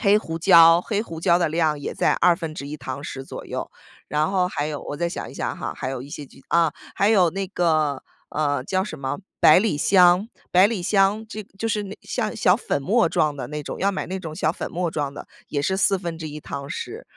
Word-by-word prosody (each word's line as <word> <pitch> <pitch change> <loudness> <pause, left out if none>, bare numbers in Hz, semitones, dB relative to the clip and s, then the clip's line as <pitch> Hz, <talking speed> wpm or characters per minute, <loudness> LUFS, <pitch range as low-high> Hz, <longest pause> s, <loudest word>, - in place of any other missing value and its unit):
黑 205 -1 +5
胡 165 -5 -5
椒， 165 -1 +7
黑 210 +2 -2
胡 165 -7 -8
椒 175 -1 +4
的 170 -3 +1
量 155 -2 +1
也 - - -4
在 - - +2
1/2 155 -4 0
汤 130 0 -6
匙 135 -2 -6
左 - - -8
右。 - - -5 0.4
然 150 +3 0
后 185 -2 +1
还 145 -4 -2
有 150 -2 -4
我 145 - -6
再 170 +2 -1
想 - - -6
一 - - -13
想 - - -3
哈， - - -4
还 - - -4
有 130 - -4
一 140 - -11
些 145 0 -7
就 - - -19
啊， 165 -3 +3 0.2
还 200 - +3
有 185 -6 +4
那 195 +2 -3
个， 155 -7 +1 0.3
呃， 145 -3 0
叫 185 +3 0
什 155 -8 -7
么？ 135 +4 -3 0.2
百 155 - +8
里 200 -7 +1
香， 180 +5 +4 0.2
百 185 +2 +7
里 210 -5 -3
香 200 +3 +2
这 215 -1 -6 0.2
就 225 - -1
是 210 -1 0
那 200 +1 -8
像 220 -4 -3
小 180 +2 +4
粉 145 - -2
末 205 - +3
状 150 -2 +1
的 - - -5
那 150 0 -5
种， - - -6
要 200 +1 +1
买 - - -3
那 190 +1 -4
种 160 -3 -7
小 155 - +1
粉 - - -6
末 175 -1 -2
状 145 -3 -3
的， - - -9 0.2
也 145 - -1
是 190 +5 0
1/4 165 -6 -1
汤 140 -1 -6
匙。 440 - -6
170 Hz, 240 characters per minute, -23 LUFS, 150-195 Hz, 0.4 s, 百